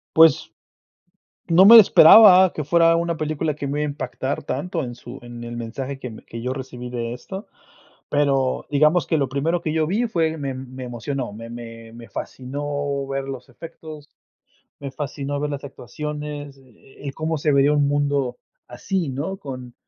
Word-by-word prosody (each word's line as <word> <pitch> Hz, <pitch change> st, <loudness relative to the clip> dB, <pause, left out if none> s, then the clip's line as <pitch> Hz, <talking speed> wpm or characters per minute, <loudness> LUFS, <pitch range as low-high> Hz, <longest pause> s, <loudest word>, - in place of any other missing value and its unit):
Pues, 160 Hz, -3 st, +5 dB, 1.0 s
no 170 Hz, +3 st, +6 dB
me 230 Hz, +3 st, +11 dB
esperaba 190 Hz, -1 st, +8 dB
que 155 Hz, -, -4 dB
fuera 165 Hz, +3 st, +4 dB
una 170 Hz, 0 st, -1 dB
película 155 Hz, 0 st, -2 dB
que 145 Hz, -1 st, -5 dB
me 145 Hz, +2 st, -2 dB
iba 150 Hz, -, 0 dB
a -, -, -2 dB
impactar 140 Hz, -1 st, -4 dB
tanto 165 Hz, +3 st, -3 dB
en 120 Hz, -1 st, -7 dB
su 125 Hz, +2 st, -11 dB
en 120 Hz, 0 st, -10 dB
el 120 Hz, 0 st, -7 dB
mensaje 130 Hz, +4 st, -5 dB
que 125 Hz, -2 st, -7 dB
me 110 Hz, -, -12 dB
que 115 Hz, 0 st, -8 dB
yo 125 Hz, +1 st, -2 dB
recibí 130 Hz, -2 st, -7 dB
de 120 Hz, -1 st, -4 dB
esto, 190 Hz, -, -9 dB, 0.6 s
pero, 135 Hz, -3 st, +1 dB
digamos, 150 Hz, +4 st, +3 dB
que 160 Hz, -, 0 dB
lo 140 Hz, -2 st, 0 dB
primero 155 Hz, +6 st, -1 dB
que 155 Hz, -, -3 dB
yo 160 Hz, -1 st, +1 dB
vi 210 Hz, +9 st, 0 dB
fue 160 Hz, -6 st, -1 dB
me 140 Hz, -3 st, -4 dB
me 130 Hz, 0 st, -8 dB
emocionó, 120 Hz, 0 st, -5 dB
me 115 Hz, +2 st, -9 dB
me 115 Hz, -1 st, -10 dB
me 115 Hz, 0 st, -12 dB
fascinó 140 Hz, +1 st, -4 dB
ver 135 Hz, 0 st, -4 dB
los 135 Hz, -1 st, -8 dB
efectos, 155 Hz, +2 st, -11 dB, 0.7 s
me 140 Hz, -1 st, -6 dB
fascinó 140 Hz, +1 st, -4 dB
ver 145 Hz, +1 st, -2 dB
las 140 Hz, -1 st, -5 dB
actuaciones, 145 Hz, +2 st, -7 dB
eh 135 Hz, +2 st, -17 dB
eh, -, -, -5 dB
cómo 160 Hz, +2 st, -2 dB
se 150 Hz, 0 st, 0 dB
vería 140 Hz, +1 st, +4 dB
un 145 Hz, -1 st, +2 dB
mundo 140 Hz, -3 st, -1 dB, 0.3 s
así, 165 Hz, +6 st, -3 dB
¿no?, 150 Hz, +9 st, -4 dB
con 130 Hz, -8 st, -9 dB
140 Hz, 180 wpm, -22 LUFS, 130-155 Hz, 1.0 s, me